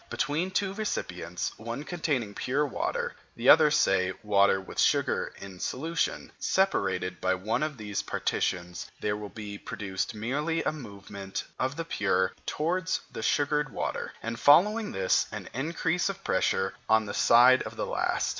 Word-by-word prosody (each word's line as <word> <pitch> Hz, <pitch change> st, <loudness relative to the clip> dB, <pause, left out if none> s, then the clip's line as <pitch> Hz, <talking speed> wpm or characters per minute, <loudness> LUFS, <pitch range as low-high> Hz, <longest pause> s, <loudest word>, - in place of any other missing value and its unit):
Between 160 Hz, +6 st, -1 dB
two 190 Hz, 0 st, -1 dB
recipients, 90 Hz, -, -3 dB
one 115 Hz, +5 st, -5 dB
containing 145 Hz, -11 st, -2 dB
pure 140 Hz, +7 st, 0 dB
water, 480 Hz, -, -2 dB, 0.2 s
the -, -, +2 dB
other, 155 Hz, -1 st, +8 dB
say, 95 Hz, -11 st, +2 dB
water 100 Hz, -2 st, +4 dB
with 95 Hz, -, -8 dB
sugar -, -, +2 dB
in 95 Hz, -2 st, -10 dB
solution, 165 Hz, -, -2 dB
separated 95 Hz, -, 0 dB
by 95 Hz, 0 st, +2 dB
one 105 Hz, +8 st, -1 dB
of 155 Hz, -2 st, -2 dB
these 105 Hz, -2 st, -3 dB
partitions, 90 Hz, 0 st, -2 dB
there 105 Hz, 0 st, -1 dB
will 105 Hz, -1 st, -6 dB
be 105 Hz, -2 st, -7 dB
produced 95 Hz, +2 st, -4 dB
merely 150 Hz, +9 st, -1 dB
a -, -, +1 dB
movement 100 Hz, -7 st, -7 dB, 0.2 s
of 130 Hz, +2 st, 0 dB
the 165 Hz, -, -4 dB
pure 95 Hz, -, +1 dB, 0.2 s
towards 175 Hz, +3 st, 0 dB
the -, -, -6 dB
sugared 150 Hz, 0 st, +1 dB
water, -, -, -3 dB
and 115 Hz, 0 st, -4 dB
following 210 Hz, +9 st, +5 dB
this, 95 Hz, -1 st, +2 dB
an -, -, -6 dB
increase 160 Hz, -, 0 dB
of 195 Hz, 0 st, -6 dB
pressure 95 Hz, 0 st, +1 dB, 0.2 s
on 110 Hz, 0 st, +4 dB
the 100 Hz, -, -5 dB
side 125 Hz, +2 st, +6 dB
of -, -, -6 dB
the -, -, -2 dB
last. -, -, 0 dB
120 Hz, 155 wpm, -28 LUFS, 100-160 Hz, 0.2 s, other